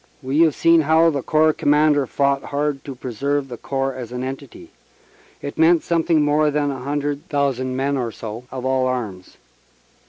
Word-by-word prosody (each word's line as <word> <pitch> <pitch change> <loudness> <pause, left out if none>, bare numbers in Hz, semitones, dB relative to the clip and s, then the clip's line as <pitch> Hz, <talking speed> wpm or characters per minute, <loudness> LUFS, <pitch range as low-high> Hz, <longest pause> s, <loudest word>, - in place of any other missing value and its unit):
We 135 +4 -1
have 160 -3 +4
seen 165 0 +4
how 160 +2 +4
the 140 -2 -2
Corps 155 +3 +3
Commander 145 -2 +2
fought 140 +1 0
hard 145 -1 -2
to 135 - -7
preserve 135 +3 -2
the 120 - -7
Corps 135 +1 -2
as 125 -3 -8
an 125 0 -4
entity. 135 0 -8 0.7
It 140 - -6
meant 165 0 +4
something 165 -2 +2
more 150 +1 +2
than 145 -1 0
a 135 - -6
hundred 145 +2 -3
thousand 130 -3 -1
men 140 +2 0
or 120 -3 -2
so 110 +3 -8
of 130 -1 -6
all 130 -1 +1
arms. 110 -8 -5
140 Hz, 180 wpm, -21 LUFS, 130-150 Hz, 0.7 s, have